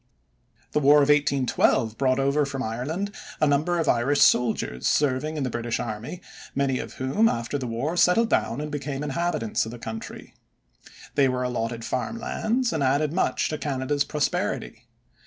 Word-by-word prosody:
The - - +2
War 145 0 +6
of 145 -1 +4
1812 135 -6 +2
brought 130 +1 +1
over 140 +2 +2
from 140 -1 -3
Ireland 155 - -3 0.3
a 155 - +4
number 150 +4 +2
of 165 -2 0
Irish 130 +5 +2
soldiers 70 - +2
serving 145 +2 +1
in 145 - -1
the 130 - -1
British 120 0 -2
army, 120 - -5 0.3
many 135 -2 +1
of - - -6
whom 140 +13 +2
after 120 +5 -2
the 130 - -4
war 125 +9 -2
settled 180 +6 +4
down 115 - +1
and 150 0 -5
became 145 -1 -4
inhabitants 145 -6 -1
of 110 - -5
the 120 - -8
country. 110 -1 -8 0.8
They 140 -2 +3
were 125 0 -1
allotted 115 -2 -3
farm 130 - -2
lands 235 0 -1
and 160 - -1
added 140 +3 +1
much 185 - +1
to 155 - -3
Canada's 140 0 -1
prosperity. 150 -2 -2
140 Hz, 170 wpm, -25 LUFS, 125-150 Hz, 0.8 s, War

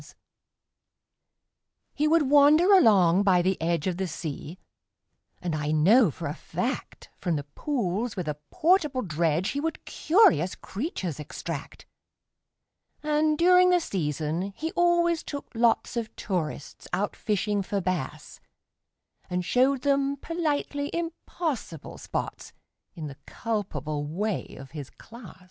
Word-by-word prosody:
He 300 - +1
would 315 -2 +3
wander 300 +7 +6
along 200 - +6
by 185 -3 +4
the 190 -1 0
edge 165 -1 0
Of 180 -2 -1
the 190 0 -1
sea, 155 +1 -6 0.8
and 175 -2 -3
I 150 -1 -2
know 185 +9 +5
for 140 - -7
a - - -3
fact - - -5
From 175 -3 -1
the 145 - -2
pools 215 - -2
with 180 -4 -4
a 150 -1 -2
portable 305 -7 +2
dredge 165 +1 0
He 280 - -2
would 320 +2 -3
curious 190 - +3
creatures 190 - -5
extract: 150 - -7 1.2
And, 305 0 +2
during 360 +2 +6
the 360 0 +4
season, 165 - -2
he 320 +1 -3
always 345 -1 +2
took 285 -1 -7
lots 235 0 +2
Of 230 -2 -4
tourists 160 -7 -4
out 205 +2 -1
fishing 210 -1 0
for 200 +1 -2
bass, 155 -5 -4 0.9
And 180 0 -2
showed 260 +3 +2
them 280 0 +1
politely 290 -2 -2
impossible 330 - -4
spots, - - -5 0.4
In 160 - -6
the 140 -2 -8
culpable 155 - -3
way 200 +6 -3
of 135 0 -11
his 145 -4 -7
class. 225 -6 -13
205 Hz, 130 wpm, -27 LUFS, -, 1.2 s, wander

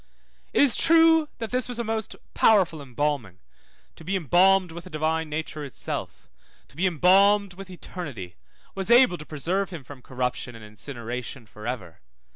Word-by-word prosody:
It - - +4
is 270 -5 +5
true 325 -1 +5
that 225 -2 -6
this 250 0 -1
was 245 - -2
a 235 - -1
most 220 -1 -3 0.2
powerful 185 -8 +3
embalming, 135 -7 -3 0.6
to - - -14
be 190 +5 -2
embalmed 185 +2 +3
with 170 +2 -9
the - - -10
Divine 160 0 -1
Nature 155 0 -5
itself, 140 - -6 0.4
to - - -19
be 185 +5 +1
embalmed 195 +4 +4
with 195 +1 -11
eternity, 145 - -8 0.4
was 195 +1 -4
able 240 -7 +5
to 150 - -10
preserve 175 +6 -1
him 170 -6 -8
from 130 0 -12
corruption 125 -1 -4
and 110 -1 -11
incineration 120 +2 -7
for 105 +1 -10
ever. 95 -10 -6
165 Hz, 165 wpm, -25 LUFS, 130-195 Hz, 0.6 s, is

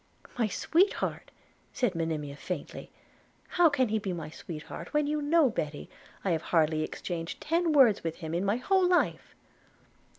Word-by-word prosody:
'My 230 -3 +1
sweetheart!' 345 - 0 0.4
said 245 -7 0
Monimia 155 -4 -3
faintly; 165 +1 -6 0.6
'how 350 -2 +4
can 260 -5 +1
he 220 +1 +1
be 195 -3 -3
my 160 -3 -6
sweetheart, 165 - -8
when 300 0 +3
you 300 +1 -1
know, 300 +1 +4
Betty, 150 -7 -4 0.3
I 190 - +2
have 160 -2 0
hardly 155 -2 +2
exchanged 165 +1 -4
ten 335 +2 +1
words 260 -9 +5
with 165 -1 -2
him 160 -2 -6
in 175 +2 0
my 200 +3 +1
whole 370 +8 +2
life?' 360 -1 +1
200 Hz, 160 wpm, -29 LUFS, -, 0.6 s, words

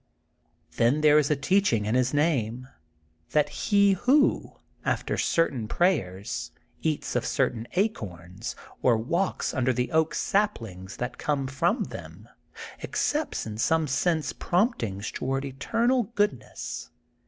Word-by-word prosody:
Then 125 +6 +3
there 150 0 +6
is 145 - +1
a 150 - +3
teaching'ln 140 - +2
his 125 0 +2
name 130 -6 0 0.7
that 150 -1 +3
he 200 +4 +3
who, 265 +9 +2 0.3
after - - -1
certain 135 -9 +1
prayers, 100 - 0 0.3
eats 155 -2 -1
of - - +1
certain 115 -1 0
acorns, 105 - -3 0.3
or 120 -3 +4
walks 170 +12 -1
under 130 -1 +2
the 125 0 -1
oak 160 0 +2
saplings 115 - -1
that 125 0 -4
conde 140 -3 -1
from 170 - +1
them, - - -9 0.5
accepts 300 +1 -1
in 110 -1 -6
some 160 +5 +2
sense 155 +3 0
promptings 120 - 0
toward 135 +1 -2
eternal 230 - +1
goodness. 205 - -2
140 Hz, 120 wpm, -27 LUFS, 115-180 Hz, 0.7 s, there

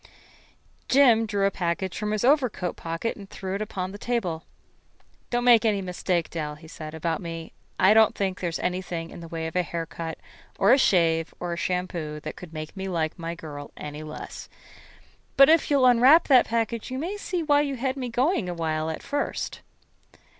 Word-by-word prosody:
Jim 240 -5 +5
drew 200 -2 0
a 200 - +2
package 180 0 -2
from 210 0 -3
his 215 +2 0
overcoat 255 - +2
pocket 165 +7 -3
and 200 -2 -11
threw 190 -1 -5
it 200 - -2
upon 190 -3 -4
the 205 - -9
table. 190 -10 -2 0.8
"Don't 240 0 0
make 240 -2 +6
any 215 -3 +2
mistake, 180 -2 -2
Dell," 150 -3 -4
he 160 +2 -14
said, 155 -1 -8
"about 160 0 -2
me. 165 -2 -7 0.3
I 190 +3 +6
don't 220 -1 +5
think 190 -2 -2
there 175 - -1
is 165 - -3
anything 180 -2 -3
in - - -9
the 165 - -9
way 165 0 -4
of 160 +1 -5
a 180 - +3
haircut 165 -1 -5 0.4
or - - +5
a 270 - +5
shave 165 -7 +2
or 175 -1 -3
a - - -2
shampoo 170 -4 -3
that 155 - -6
could 180 -3 -11
make 155 +1 -7
me 190 0 -4
like 165 -2 -2
my 170 0 -4
girl 145 -3 -8
any 150 0 -7
less. 155 0 -8 0.9
But 275 +1 +8
if 325 +1 +4
you'll 280 -3 +4
unwrap 255 +6 +6
that 260 -3 +6
package 230 0 -1
you 255 - -4
may 345 +9 -3
see 365 -4 -3
why 290 -1 +4
you 280 -2 -2
had 260 +1 -1
me 255 -3 -4
going 245 - +1
a 175 - -4
while 160 -1 -1
at 160 - -5
first." 285 +1 -3
185 Hz, 200 wpm, -26 LUFS, 165-235 Hz, 0.9 s, But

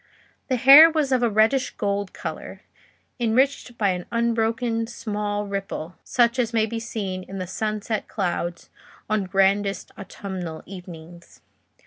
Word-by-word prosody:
The 260 - +1
hair 275 +6 +9
was 310 -4 0
of 255 -1 +3
a 240 - +3
reddish 220 +5 +2
gold 200 -1 -2
colour, - - -7 0.6
enriched 245 +1 +1
by 205 -2 +2
an 180 -1 -3
unbroken 230 0 0
small 210 -2 -3
ripple, 195 -4 -5
such 240 0 +2
as 235 -1 0
may 220 -1 +3
be 225 +1 -4
seen 200 -5 -4
in 195 +1 -9
the 185 - -3
sunset 215 +3 -3
clouds 175 -3 -3 0.4
on 210 -2 +1
grandest 195 +1 +1
autumnal 185 -5 -7
evenings. 175 -2 -12
210 Hz, 135 wpm, -24 LUFS, 190-235 Hz, 0.6 s, hair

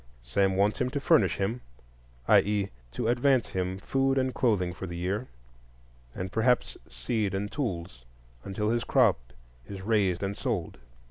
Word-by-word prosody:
Sam 95 +10 +1
wants 105 +6 +2
him 125 - +1
to 140 +2 -2
"furnish" 95 -9 +3
him,—i.e., 60 - -1 0.2
to - - -2
advance 125 +1 +2
him 95 0 -2
food 135 +6 0
and 130 -1 +1
clothing 100 -8 +1
for 95 +2 -7
the 85 0 -6
year, 100 +8 -2 0.9
and 90 0 -4
perhaps 125 +4 +2
seed 95 - -2
and 100 +1 -3
tools, 85 - -4 0.4
until 105 +2 -1
his 120 0 0
crop - - +3 0.5
is 95 -2 -7
raised 100 -4 +1
and 100 +1 -2
sold. 110 -9 -3
100 Hz, 145 wpm, -28 LUFS, 90-120 Hz, 0.9 s, furnish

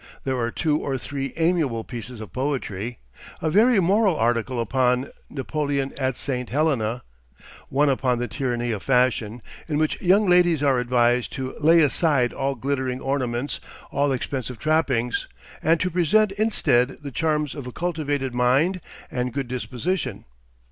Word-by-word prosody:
There 130 -2 -1
are 115 -1 0
two 150 +4 0
or 135 -2 -2
three 135 +1 -4
amiable 160 -9 +1
pieces 120 -1 -8
of 110 - -9
poetry, 125 -5 -3 0.4
a 160 - -1
very 220 +4 +5
moral 195 +1 +3
article 120 0 0
upon 125 +2 +1 0.2
"Napoleon 140 0 -2
at 130 -2 0
St. 125 -3 -1
Helena," 125 -5 0 0.7
one 145 +3 +2
upon 130 -2 +1
the 120 +1 -2
tyranny 120 0 -2
of 105 -3 -3
fashion, 125 -3 +1 0.2
in 150 -3 -1
which 155 0 0
young 195 +3 +4
ladies 175 -4 +4
are 135 -3 +3
advised 120 0 +2
to 130 -2 -4
"lay 165 +2 +6
aside 140 -3 +2
all 135 0 -1
glittering 130 0 -2
ornaments, 130 -1 -2 0.3
all 140 0 +1
expensive 130 -1 -3
trappings," 135 -6 0 0.3
and 165 +1 +3
to 185 - 0
present 190 +5 +3
instead 150 - +1
the 140 - -6
charms 150 -1 0
of 140 -4 -7
a - - -6
cultivated 145 -5 -2
mind 135 +10 +2 0.3
and 125 0 -2
good 135 -1 -2
disposition. 125 - -3
135 Hz, 150 wpm, -24 LUFS, 125-155 Hz, 0.7 s, lay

